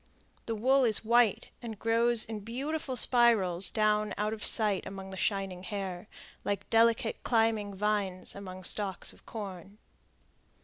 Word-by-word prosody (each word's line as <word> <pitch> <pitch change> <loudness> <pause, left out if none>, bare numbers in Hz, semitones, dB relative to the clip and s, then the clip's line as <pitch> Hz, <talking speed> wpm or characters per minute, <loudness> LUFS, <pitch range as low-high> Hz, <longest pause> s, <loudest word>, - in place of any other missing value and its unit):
The 225 - -2
wool 260 +5 +3
is 225 -2 +2
white, 235 -2 +2
and 225 -3 -7
grows 230 +1 +2
in 220 -1 -6
beautiful 260 +6 -4
spirals 225 -8 +4
down 215 -1 0
out 210 +1 -1
of 215 - -7
sight 210 -4 +4
among 195 -1 -8
the - - -7
shining 195 -1 -2
hair, 190 -1 -6 0.4
like 200 -1 -3
delicate 230 0 +2
climbing 225 -3 0
vines 200 -2 -2
among 185 -2 -9
stalks 195 0 -1
of - - -22
corn. 200 -2 -8
210 Hz, 140 wpm, -30 LUFS, 195-230 Hz, 0.4 s, spirals